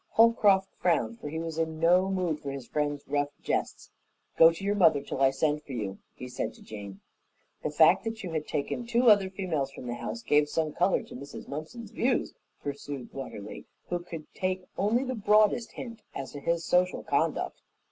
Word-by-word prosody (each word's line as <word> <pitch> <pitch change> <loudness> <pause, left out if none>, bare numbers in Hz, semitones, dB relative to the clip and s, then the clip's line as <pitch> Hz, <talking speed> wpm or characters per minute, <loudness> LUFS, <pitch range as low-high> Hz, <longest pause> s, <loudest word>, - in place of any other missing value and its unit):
Holcroft 210 -4 +5
frowned, 115 -10 +1
for 150 - -6
he 160 - -4
was 165 0 -4
in 160 -1 -1
no 180 +3 +4
mood 180 -5 0
for 140 - -6
his 135 -2 -6
friend's 145 0 -2
rough 145 0 0
jests. - - -2 0.4
"Go 165 0 +8
to 165 +3 -8
your 200 +1 +1
mother 165 -8 +5
till 135 - -4
I 135 - +6
send 150 +2 0
for 140 - -9
you," 100 -5 -4 0.2
he 125 - -7
said 125 - -4
to - - -16
Jane. 100 -2 -9 0.6
"The - - -1
fact 160 +4 +5
that 225 -1 -4
you 180 - -4
had 155 -2 -2
taken 150 +11 -2
two 240 0 +5
other 200 -2 +4
females 175 -8 -2
from 135 -2 -10
the 120 - -3
house 115 -1 -5
gave 150 0 +3
some 155 -1 -1
color 180 +2 +2
to - - -11
Mrs. 140 +3 -9
Mumpson's 200 +10 -7
views," 250 +1 0 0.3
pursued 140 -2 -6
Watterly, 100 - -7 0.2
who 175 - 0
could 165 -3 -8
take 185 0 -2
only 220 +6 +2
the 260 -1 -2
broadest 215 +1 +3
hint 230 -2 -8
as 135 -2 -5
to 145 - -7
his 170 +3 -1
social 180 +1 +2
conduct. - - 0
160 Hz, 200 wpm, -29 LUFS, 140-195 Hz, 0.6 s, Go